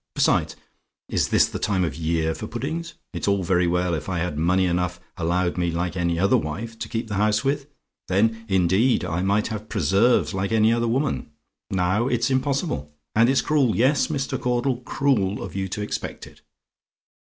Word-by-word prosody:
Besides, - - +2 0.5
is - - +1
this - - +5
the - - -5
time 95 -3 +1
of 85 - 0
the - - -10
year 80 0 0
for 110 - -6
puddings? 160 +9 -4 0.2
It's - - -3
all 100 -1 +2
very 90 0 +2
well 90 0 +1
if 75 +2 -3
I 90 - -1
had 85 -2 -2
money 90 +4 +2
enough 90 0 -1 0.2
allowed 85 +1 0
me 85 -1 +1
like 85 +2 -2
any 85 -2 0
other 100 +3 +3
wife 110 +10 -5
to - - -5
keep 115 -1 -3
the 105 - -5
house 105 +2 +2
with: 140 0 -1 0.4
then, 110 +4 +1
indeed, 95 +6 +3
I 85 +3 -2
might 100 +3 +1
have 110 -1 -6
preserves 105 +2 +2
like 95 +2 -2
any 110 0 +4
other 120 0 0
woman; 135 +5 -1 0.4
now, 95 +5 +1
it's 120 0 +1
impossible; 130 - -1 0.2
and 115 +3 +4
it's 135 - +3
cruel 140 -7 +2
yes, 135 +5 +3
Mr. 140 -4 -2
Caudle, 125 +1 0
cruel 120 -6 0
of 95 -2 -8
you 95 -1 -1
to 105 +2 -4
expect 105 - -5
it. - - -17
100 Hz, 190 wpm, -24 LUFS, 90-120 Hz, 0.5 s, this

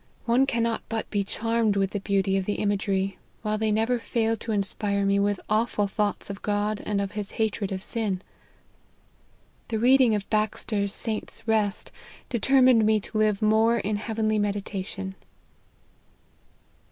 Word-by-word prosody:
One 245 +3 +3
cannot 230 -2 0
but 225 0 -2
be 205 -1 +1
charm 230 +3 0
ed 205 - +2
with 195 -1 +1
the 205 - -2
beauty 195 -1 +1
of 190 -1 0
the 205 - -1
imagery, 195 -2 -1 0.2
while 215 -1 -1
they 220 -1 +1
never 225 +3 +1
fail 225 -1 0
to 225 - -5
inspire 200 0 0
me 200 0 +3
with 205 0 +1
awful 215 -1 +1
thoughts 205 +1 -1
of 200 - -8
God 205 0 -1
and 205 -1 0
of 200 -1 -2
his 205 -2 -5
hatred 215 -2 -1
of 190 0 -4
sin. 205 -6 -2 1.4
The 225 - -1
reading 250 0 +5
of 200 -2 -3
Baxter's 215 -1 0
o - - -5
Saint's 225 0 -4
Rest, 215 -2 0 0.4
determined 255 -1 +4
me 215 0 +4
to 215 - -6
live 215 -1 +2
more 220 +2 +4
in 210 -1 -1
heavenly 215 0 0
meditation." 195 -2 -3
210 Hz, 160 wpm, -26 LUFS, 200-225 Hz, 1.4 s, reading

